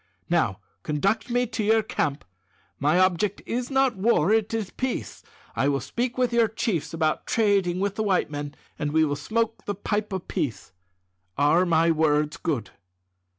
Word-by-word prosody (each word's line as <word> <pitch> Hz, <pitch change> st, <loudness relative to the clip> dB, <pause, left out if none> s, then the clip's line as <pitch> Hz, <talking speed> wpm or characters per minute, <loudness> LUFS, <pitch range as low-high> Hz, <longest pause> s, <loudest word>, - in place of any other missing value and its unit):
Now, -, -, +2 dB, 0.2 s
conduct 195 Hz, -, 0 dB
me 245 Hz, +1 st, +2 dB
to 225 Hz, -2 st, -3 dB
your 220 Hz, +1 st, +3 dB
camp. 150 Hz, -8 st, -2 dB, 0.5 s
My 150 Hz, +5 st, +3 dB
object 185 Hz, +2 st, +1 dB
is 245 Hz, +1 st, -2 dB
not 265 Hz, -3 st, +2 dB
war; 195 Hz, -3 st, +2 dB
it 220 Hz, -1 st, +1 dB
is 220 Hz, -4 st, -2 dB
peace. 260 Hz, -1 st, -4 dB, 0.3 s
I 135 Hz, -, +1 dB
will 140 Hz, -1 st, +1 dB
speak 240 Hz, -, -3 dB
with 250 Hz, -2 st, +1 dB
your 235 Hz, -1 st, +4 dB
chiefs 205 Hz, -7 st, -2 dB
about 160 Hz, -2 st, -1 dB
trading 200 Hz, -5 st, +2 dB
with 200 Hz, 0 st, -1 dB
the 220 Hz, -, 0 dB
white 190 Hz, -7 st, +1 dB
men, 145 Hz, -1 st, -5 dB, 0.2 s
and 145 Hz, 0 st, -2 dB
we 160 Hz, 0 st, +4 dB
will 145 Hz, -1 st, -1 dB
smoke 225 Hz, +10 st, -2 dB
the 205 Hz, -, -2 dB
pipe 210 Hz, +1 st, -2 dB
of 190 Hz, -2 st, -4 dB
peace. 150 Hz, -, -3 dB, 0.7 s
Are 155 Hz, +6 st, +4 dB
my 165 Hz, 0 st, +4 dB
words 150 Hz, -1 st, +1 dB
good?" 130 Hz, -, -2 dB
190 Hz, 170 wpm, -25 LUFS, 155-225 Hz, 0.7 s, your